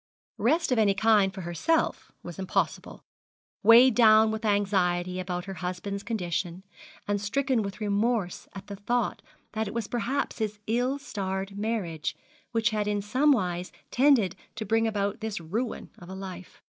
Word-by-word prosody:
Rest 285 +9 +2
of 250 - +3
any 200 -3 +3
kind 210 -2 +4
for 190 0 -7
herself 175 - 0
was 175 +1 -8
impossible, 190 - -2 0.6
weighed 235 +4 +8
down 220 -1 +6
with 220 +1 -4
anxiety 185 -3 +1
about 180 -1 -3
her 195 - -6
husband's 185 +2 -4
condition, 180 -4 -3 0.4
and 205 -1 0
stricken 260 +3 +1
with 200 -2 -5
remorse 210 -2 -1
at 195 0 -8
the 200 - -7
thought 235 +3 -1 0.3
that 220 0 -2
it 205 - -7
was 230 -3 -2
perhaps 245 +4 -2
his 215 -1 -2
ill 245 +5 0
starred 195 -7 -4
marriage 200 -7 -2 0.4
which 225 -1 +1
had 210 -1 -1
in 205 0 0
some 260 +8 +3
wise 180 -7 0 0.2
tended 250 -8 +4 0.2
to 220 -1 -4
bring 225 +2 +2
about 205 -2 -1
this 220 -3 -4
ruin 215 +9 -4
of 175 - -12
a 190 - -6
life. 185 -2 -9
205 Hz, 160 wpm, -27 LUFS, 190-230 Hz, 0.6 s, weighed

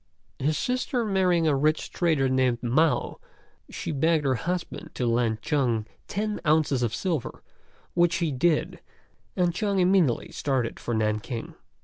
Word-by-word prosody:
His 150 +2 0
sister 250 -1 -1
marrying 180 -5 +2
a 150 - +3
rich 155 +3 0
trader 160 -6 +1
named 130 -2 +1
Mao, 150 +7 +1 0.5
she - - -5
begged 155 +1 +1
her 135 - +3
husband 175 +8 -4
to 125 - -1
lend 115 -2 0
Chung 120 -7 0 0.2
ten 210 +1 -2
ounces 150 -4 +2
of 120 -3 0
silver, 165 -9 -3 0.5
which 175 +1 +3
he 170 -4 0
did, 150 +4 +1 0.6
and 175 -2 +1
Chung 200 +2 -1
immediately 180 -8 +2
started 130 -5 -1
for 120 - -3
Nanking. 110 +2 -2
150 Hz, 140 wpm, -26 LUFS, 125-175 Hz, 0.6 s, a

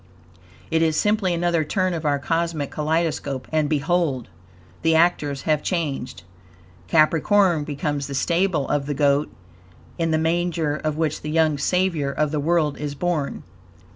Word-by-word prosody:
It 160 0 +2
is 160 -2 +2
simply 210 -3 +1
another 170 -1 +1
turn 185 +4 0
of 165 -2 -4
our 145 -1 +2
cosmic 165 -1 -2
kaleidoscope, 150 -4 -1
and 155 -2 +1
behold! 150 - 0 0.5
the 165 0 +3
actors 150 -5 +2
have 155 -2 +1
changed. 140 - -3 0.6
Capricorn 165 +2 +3
becomes 145 -1 -3
the 140 - -5
stable 170 +1 +1
of 145 -1 -1
the 145 - -2
Goat, 140 +1 +2 0.7
in 165 -1 +1
the 160 - +2
manger 165 -1 0
of 155 -1 -3
which 155 -2 -1
the 150 - -5
young 155 -2 +2
Savior 170 -3 0
of 150 +1 0
the 155 - -1
world 155 -1 +1
is 145 -1 -4
born. 165 -3 -2
155 Hz, 150 wpm, -23 LUFS, 145-170 Hz, 0.7 s, the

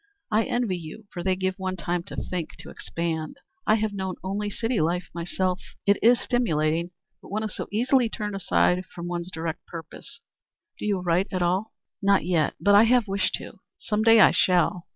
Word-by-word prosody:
I 215 +1 +3
envy 240 -7 0
you, 170 +7 -10
for 175 - -4
they 185 +1 +1
give 185 +1 -2
one 185 0 -2
time 175 0 -2
to - - -8
think 180 -3 -4
to - - -10
expand. 160 -2 -4 0.3
I 215 - +5
have 215 -1 -1
known 190 -2 -3
only 205 +2 -2
city 225 +1 -1
life 170 +2 -1
myself. 180 +2 -1 0.2
It 200 0 +4
is 240 +2 +6
stimulating, 170 -8 0 0.3
but - - -14
one 215 +2 -2
is 215 - -4
so - - -4
easily 245 +2 +2
turned 210 -2 -4
aside 180 - +2
from 170 0 -7
one's 175 0 -4
direct 165 0 -4
purpose. 185 +11 -9 0.6
Do - - -3
you 200 -3 0
write 180 +2 +1
at 185 -1 0
all?" 185 +5 0 0.3
"Not 200 -2 +3
yet. 170 -4 +1
But 205 - +4
I 205 +3 +8
have 240 -1 +3
wished 195 +1 0
to. - - -10 0.2
Some 210 0 -1
day 225 0 +7
I 195 - +8
shall. 180 -1 +2
190 Hz, 195 wpm, -25 LUFS, 175-215 Hz, 0.6 s, I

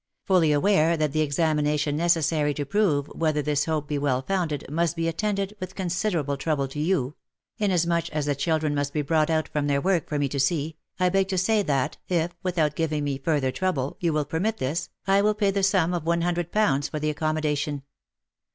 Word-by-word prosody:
Fully 180 -5 +4
aware 165 +1 +3
that 155 -2 0
the 155 +2 +1
examination 150 -1 +1
necessary 160 -3 +1
to 145 - -3
prove 165 -6 +1
whether 155 -2 0
this 145 -1 +1
hope 155 -2 -1
be 145 -1 -1
well 135 -2 0
founded, 170 -5 -2
must 170 +3 0
be 165 0 -1
attended 200 +3 -1
with 185 0 -6
considerable 175 -6 -1
trouble 140 -1 -1
to 145 - -6
you 150 -5 0 0.2
— - - -65
inasmuch 175 -4 +1
as 150 -2 -2
the 145 - +1
children 155 +1 0
must 145 -1 -1
be 150 - 0
brought 155 +2 +2
out 160 -1 +1
from 145 -1 -1
their 140 -1 +2
work 180 +1 0
for 150 - -1
me 145 -1 +1
to 140 - -3
see, 155 +2 0 0.2
I 180 0 +3
beg 195 +1 +2
to 190 -1 -2
say 210 +4 +2
that, 140 -8 -1
if, 175 -1 +1
without 165 -5 0
giving 155 -2 -1
me 140 -2 -2
further 140 -2 0
trouble, 145 -6 -1
you 170 -2 +1
will 150 -1 0
permit 190 +10 -1
this, 145 +7 -2 0.2
I 195 0 +4
will 210 +1 +2
pay 205 -2 +2
the 200 0 0
sum 185 -3 +2
of 175 -3 -2
one 170 +1 +1
hundred 175 0 -1
pounds 145 -10 +2
for 155 - -4
the 155 0 -1
accom 155 +1 -1
modation. 145 -2 -2
155 Hz, 215 wpm, -25 LUFS, 145-180 Hz, 0.2 s, Fully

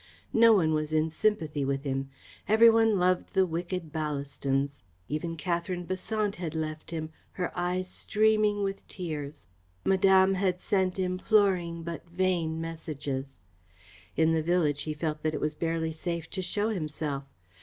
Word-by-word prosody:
No 230 0 +7
one 160 -6 +3
was 155 0 -1
in 155 +1 +2
sympathy 160 -6 0
with 135 0 -1
him. 135 -1 -2 0.4
Every 225 +2 +7
one 225 -2 +4
loved 180 +1 +1
the 190 -1 +5
wicked 175 -1 -4
Ballastons. 140 -2 -1 0.3
Even 165 +3 -3
Katherine 175 +1 -2
Besant 205 +3 -2
had 165 -3 -4
left 155 -1 -4
him, 160 -1 -4 0.2
her 180 -1 -3
eyes 180 +1 -1
streaming 215 +1 +2
with 195 0 -3
tears. 150 - -6 0.4
Madame 190 0 +5
had 185 -1 0
sent 190 -2 0
imploring 185 -2 +1
but 170 0 -6
vain 170 -3 0
messages. 145 -5 -5 0.8
In 160 0 +3
the 160 - +2
village 155 -3 +1
he 155 -1 -3
felt 150 0 -2
that 155 -1 0
it - - -2
was 150 0 -1
barely 165 0 -1
safe 170 0 -3
to 190 - -3
show 205 +4 -1
himself. 150 -7 -3
170 Hz, 150 wpm, -29 LUFS, 155-190 Hz, 0.8 s, No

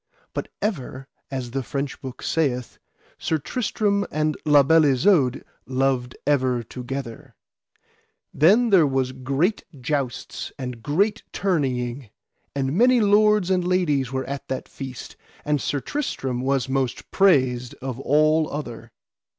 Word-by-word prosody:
But - - -3 0.2
ever, 135 - -3 0.2
as 130 -3 -4
the 135 +2 -2
French 140 +1 -4
book 130 -2 -8
saith, 125 -6 -1 0.4
Sir 160 - 0
Tristram 200 - 0
and 155 0 0
La 145 -1 +7
Beale 160 +3 +5
Isoud 140 -2 +3 0.2
loved 130 -2 0
ever 130 -4 +1
together. 125 0 -7 1.0
Then 210 - +4 0.2
was 135 -1 0
there 130 0 -13
great 140 - 0 0.2
jousts 135 -2 -3
and 125 -3 -6
great 200 - +1
tourneying, 130 - -1 0.5
and 135 -1 -1
many 245 +4 +5
lords 210 -2 +4
and 180 -1 +2
ladies 160 -8 +1
were 130 0 -2
at 140 0 -6
that 130 -1 -4
feast, 130 -3 -8 0.3
and 150 -2 +1
Sir 145 - -1
Tristram 135 - -3
was 135 -1 0
most 130 -2 -2
praised 130 -10 +3
of 130 -1 -6
all 155 +3 +3
other. 120 -6 -6
135 Hz, 130 wpm, -23 LUFS, 130-165 Hz, 1.0 s, La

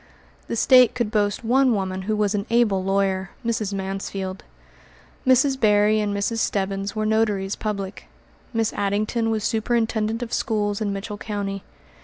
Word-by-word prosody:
The - - -3
State 250 +1 +5
could 235 -4 -1
boast 205 0 0
one 250 +1 +3
woman 190 -1 -2
who 215 +3 -1
was 210 -1 +1
an 205 +1 -2
able 225 -5 +2
lawyer, 190 -1 0 0.2
Mrs. 220 -3 -1
Mansfield. 195 0 -4 0.8
Mrs. 265 +1 +4
Berry 210 -1 +4
and 210 -1 0
Mrs. 200 +3 -1
Stebbins 195 -1 -1
were 215 0 -1
notaries 210 -3 +1
public. 200 -3 -5 0.4
Miss 225 -2 0
Addington 215 +3 0
was 220 -2 -1
superintendent 225 0 0
of 235 - -7
schools 210 -3 -1
in 205 -2 0
Mitchell 205 +1 -5
County. 200 -2 -4
210 Hz, 150 wpm, -23 LUFS, 195-225 Hz, 0.8 s, State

